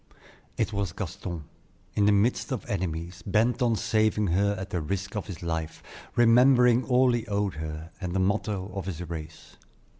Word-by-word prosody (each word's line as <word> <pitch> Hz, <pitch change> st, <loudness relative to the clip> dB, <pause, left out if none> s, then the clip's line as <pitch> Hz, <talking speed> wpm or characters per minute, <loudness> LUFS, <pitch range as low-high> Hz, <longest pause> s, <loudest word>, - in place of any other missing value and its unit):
It -, -, 0 dB
was 100 Hz, -5 st, -2 dB
Gaston, 90 Hz, -3 st, -5 dB, 0.5 s
in 105 Hz, -, +2 dB
the -, -, +6 dB
midst 105 Hz, +7 st, +2 dB
of 130 Hz, -, -3 dB
enemies, 85 Hz, -2 st, -3 dB
bent 115 Hz, +6 st, +1 dB
on 120 Hz, -2 st, +3 dB
saving 110 Hz, +1 st, +1 dB
her 100 Hz, +4 st, +2 dB
at 95 Hz, +2 st, -6 dB
the 90 Hz, -, -1 dB
risk 100 Hz, +6 st, -3 dB
of 105 Hz, -, -3 dB
his 90 Hz, -4 st, -7 dB
life, 80 Hz, -1 st, -3 dB, 0.3 s
remembering 125 Hz, +1 st, +5 dB
all 125 Hz, 0 st, +4 dB
he 120 Hz, -1 st, -2 dB
owed 100 Hz, -2 st, 0 dB
her, 80 Hz, +1 st, -6 dB
and 90 Hz, -1 st, -3 dB
the -, -, +2 dB
motto 100 Hz, 0 st, -1 dB
of 95 Hz, -2 st, -5 dB
his 90 Hz, -2 st, -5 dB
race. 80 Hz, -1 st, -8 dB
100 Hz, 175 wpm, -27 LUFS, 85-110 Hz, 0.5 s, the